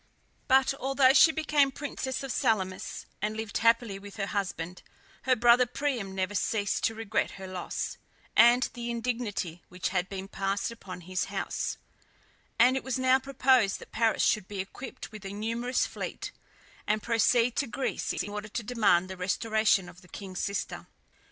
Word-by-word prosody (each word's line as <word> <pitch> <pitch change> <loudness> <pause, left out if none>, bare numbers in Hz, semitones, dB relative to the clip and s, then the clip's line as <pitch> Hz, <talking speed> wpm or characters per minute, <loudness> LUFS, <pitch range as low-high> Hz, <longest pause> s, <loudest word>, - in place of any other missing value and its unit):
But 265 0 +4
although 270 0 +4
she 320 - +7
became 300 -3 +2
princess 270 -2 -4
of 270 - -4
Salamis, 190 -6 -1 0.2
and 215 +1 -2
lived 220 -1 -3
happily 230 -2 +3
with 200 0 -11
her 200 - -1
husband, 180 -4 -3 0.4
her 260 -1 +4
brother 240 +1 +5
Priam 245 -7 -2
never 190 +1 -1
ceased 205 0 0
to 225 - 0
regret 220 -1 -1
her 190 - -7
loss, 185 -1 -4 0.4
and 240 +2 +7
the 240 -1 -5
indignity 230 -8 -3
which 180 0 -3
had 185 0 -1
been 195 -1 -5
passed 195 +2 -2
upon 190 -6 -9
his 185 +1 -2
house; - - -3 0.8
and 250 +3 +6
it 265 - -2
was 265 0 -2
now 260 0 +4
proposed 260 -5 +3
that - - -13
Paris 225 -1 +2
should 215 -4 +2
be 205 -2 -6
equipped 225 +8 -7
with 215 -2 -10
a 195 - -5
numerous 230 +4 -1
fleet, - - -5 0.6
and 215 0 +1
proceed 235 +1 +3
to 280 - +1
Greece 250 +4 -2
in - - -2
order 210 0 -5
to 235 +2 -4
demand 205 -6 +3
the 190 0 -7
restoration 205 +1 +2
of 180 - -13
the 180 - -18
king's 185 +1 -7
sister. 200 0 -3
220 Hz, 170 wpm, -29 LUFS, 195-250 Hz, 0.8 s, she